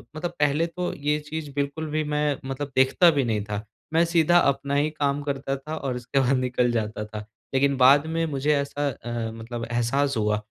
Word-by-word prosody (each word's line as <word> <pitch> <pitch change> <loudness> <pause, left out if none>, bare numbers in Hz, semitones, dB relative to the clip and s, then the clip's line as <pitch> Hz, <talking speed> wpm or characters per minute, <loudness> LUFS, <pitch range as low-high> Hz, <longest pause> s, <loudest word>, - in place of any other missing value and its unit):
मतलब 175 +2 -3
पहले 150 +3 +2
तो 175 +2 -4
ये 150 +1 -1
चीज़ 150 -1 -6
बिल्कुल 145 +3 -2
भी 155 0 0
मैं 150 -1 0
मतलब 135 +1 -4
देखता 130 +7 +5
भी 140 -3 +1
नहीं 110 -3 0
था, 105 +1 -5 0.3
मैं 165 +1 +5
सीधा 170 0 +4
अपना 140 0 +1
ही 145 +2 +2
काम 145 -2 -1
करता 135 -1 -2
था 150 +4 -6
और 135 -4 -3
उसके 125 +3 -1
बाद 130 0 +3
निकल 125 -1 +1
जाता 110 -2 -2
था, 105 0 -7 0.3
लेकिन 140 +1 +3
बाद 140 +4 +6
में 165 0 0
मुझे 150 -1 0
ऐसा 140 +1 -1
अ, 120 -2 -4
मतलब 115 +1 -6
एहसास 130 +3 +1
हुआ 105 -1 +1
140 Hz, 200 wpm, -25 LUFS, 125-150 Hz, 0.3 s, बाद